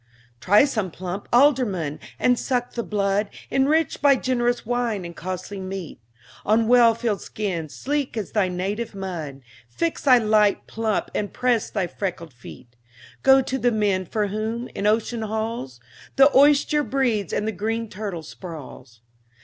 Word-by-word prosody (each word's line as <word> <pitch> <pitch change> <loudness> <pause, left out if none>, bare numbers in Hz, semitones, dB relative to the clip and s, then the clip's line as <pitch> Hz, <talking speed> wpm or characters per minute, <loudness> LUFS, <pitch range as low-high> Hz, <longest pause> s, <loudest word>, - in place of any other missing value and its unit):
Try 205 - +5
some 215 -9 -2
plump 185 +3 -6
alderman, 235 - +2 0.2
and 245 -1 +2
suck 245 -2 -2
the 235 - -2
blood 200 -1 0 0.2
Enriched 290 +3 +1
by 285 -1 +6
generous 245 -2 0
wine 235 -5 -1
and 170 0 -8
costly 185 +2 -6
meat; 185 -8 -7 0.4
On 220 +2 +2
well 235 -1 +6
filled 225 -5 -2
skins, 175 -8 -4
sleek 285 -3 -2
as 210 -4 -4
thy 205 -4 +2
native 200 +5 -3
mud, 165 -8 -6 0.3
Fix 330 - -2
thy 255 -3 +6
light 215 -2 +2
pump, 220 -2 -2
and 205 - -2
press 245 -3 0
thy 195 -4 -1
freckled 175 -4 -5
feet. 120 0 -13 0.5
Go 265 0 +6
to 265 +1 -3
the 245 -1 +2
men 200 -4 0
for 210 +1 -1
whom, 220 +4 -3
in 200 - -2
ocean's 225 +1 0
halls, 220 - -4 0.4
The 275 +1 +5
oyster 295 +2 +5
breeds 245 - 0
and 210 - -1
the - - 0
green 225 +3 -3
turtle 195 -5 -6
sprawls. 155 - -10
215 Hz, 155 wpm, -23 LUFS, 185-245 Hz, 0.5 s, by